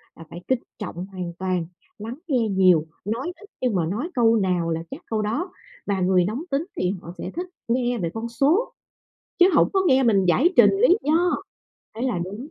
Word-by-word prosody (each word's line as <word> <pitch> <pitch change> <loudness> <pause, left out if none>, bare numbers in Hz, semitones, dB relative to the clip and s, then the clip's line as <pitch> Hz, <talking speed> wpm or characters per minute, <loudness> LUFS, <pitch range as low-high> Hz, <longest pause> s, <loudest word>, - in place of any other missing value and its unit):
là 165 - -11
phải 175 +1 -9
kính 260 -2 +2 0.2
trọng 175 +2 -5
hoàn 185 -3 -6
toàn, 185 -2 -1 0.3
lắng 225 +3 -6
nghe 245 -6 +1
nhiều, 185 -5 +4 0.2
nói 235 +11 -2
ít 415 -1 -16
nhưng 245 -6 +1
mà 170 -3 +1
nói 225 - -3
câu 230 -2 +4
nào 180 -5 +1
là 165 0 -2
chắc - - -7
câu 220 -1 -1
đó. 285 - -2 0.3
Và 195 -2 -1
người 180 -1 +3
nóng 230 - -3
tính 275 +4 +1
thì 180 0 +1
họ 170 - -9
sẽ - - -5
thích 360 +1 -3 0.2
nghe 245 0 0
về 170 -5 -2
con 225 +1 -4
số 290 - +1 0.7
chứ 355 - +7
hổng - - +5
có 385 - +2
nghe 265 -3 +4
mình 200 -6 +3
giải 255 - +4
trình - - +8
lý 390 -1 +4
do, 335 +4 +2 0.6
ấy 230 - -4
là 240 -9 0
đúng 205 +10 -7
225 Hz, 210 wpm, -23 LUFS, 185-270 Hz, 0.7 s, trình